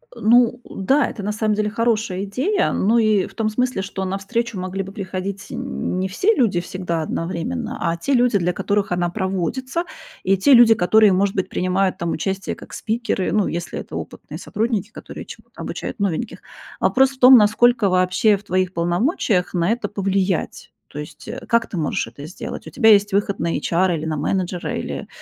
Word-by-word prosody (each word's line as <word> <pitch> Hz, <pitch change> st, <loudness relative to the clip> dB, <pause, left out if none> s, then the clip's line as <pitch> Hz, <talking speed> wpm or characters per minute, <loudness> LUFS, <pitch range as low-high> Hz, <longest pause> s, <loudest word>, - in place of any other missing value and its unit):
Э, -, -, -11 dB
ну 240 Hz, +2 st, +4 dB
да, 270 Hz, +9 st, +1 dB
это 205 Hz, -, -7 dB
на 210 Hz, -, -1 dB
самом 215 Hz, 0 st, 0 dB
деле 210 Hz, 0 st, 0 dB
хорошая 220 Hz, -4 st, 0 dB
идея, 270 Hz, -, 0 dB
но 225 Hz, +4 st, +2 dB
и 215 Hz, -4 st, +2 dB
в 195 Hz, -, -16 dB
том 220 Hz, -1 st, 0 dB
смысле, 250 Hz, -2 st, -1 dB
что 190 Hz, -1 st, -4 dB
на 190 Hz, +1 st, -2 dB
встречу 230 Hz, +1 st, -3 dB
могли 185 Hz, +1 st, -3 dB
бы 195 Hz, -, -9 dB
приходить 195 Hz, 0 st, -5 dB
не 190 Hz, -7 st, -3 dB
все 380 Hz, -, +2 dB
люди 205 Hz, -8 st, +2 dB
всегда 175 Hz, -2 st, -3 dB
одновременно, 205 Hz, -, -3 dB
а -, -, -1 dB
те 275 Hz, +11 st, -1 dB
люди, 245 Hz, -4 st, +3 dB
для 180 Hz, -1 st, 0 dB
которых 200 Hz, 0 st, -1 dB
она 175 Hz, -1 st, 0 dB
проводится, 210 Hz, -, -2 dB, 0.4 s
и 195 Hz, +1 st, +2 dB
те 270 Hz, +9 st, +5 dB
люди, 235 Hz, -2 st, +8 dB
которые, 215 Hz, +1 st, +4 dB
может 195 Hz, +1 st, +1 dB
быть, 190 Hz, -, -1 dB
принимают 185 Hz, +1 st, 0 dB
там 170 Hz, -1 st, -2 dB
участие 195 Hz, +4 st, -3 dB
как -, -, -13 dB
спикеры, 225 Hz, -4 st, -2 dB
ну, 210 Hz, -2 st, +2 dB
если 170 Hz, +1 st, -4 dB
это -, -, -8 dB
опытные -, -, -7 dB
сотрудники, 220 Hz, -2 st, -2 dB
которые -, -, -9 dB
чему-то -, -, -12 dB
обучают -, -, -5 dB
новеньких. 200 Hz, +3 st, -2 dB, 0.4 s
Вопрос 265 Hz, +1 st, +3 dB
в 265 Hz, -, -15 dB
том, 255 Hz, 0 st, +9 dB
насколько 225 Hz, 0 st, +4 dB
вообще 185 Hz, +3 st, +3 dB
в 200 Hz, -, -16 dB
твоих 185 Hz, -1 st, -1 dB
полномочиях 180 Hz, -, 0 dB
на 175 Hz, +2 st, +1 dB
это 230 Hz, -3 st, -1 dB
повлиять. 195 Hz, -3 st, -2 dB, 0.2 s
То 150 Hz, -, -9 dB
есть, 150 Hz, -, -10 dB
э, 240 Hz, +3 st, -6 dB
как 235 Hz, -1 st, +2 dB
ты -, -, -6 dB
можешь 155 Hz, -3 st, -1 dB
это 140 Hz, +6 st, -10 dB
сделать? 175 Hz, -, -7 dB
У -, -, -6 dB
тебя 245 Hz, -5 st, +3 dB
есть 205 Hz, 0 st, +4 dB
выход 200 Hz, 0 st, 0 dB
на 170 Hz, -, -1 dB
эйчара 175 Hz, +1 st, +1 dB
или 160 Hz, 0 st, -4 dB
на 155 Hz, -, -2 dB
менеджера, 180 Hz, +3 st, -2 dB
или, -, -, -5 dB
200 Hz, 195 wpm, -21 LUFS, 185-230 Hz, 0.4 s, том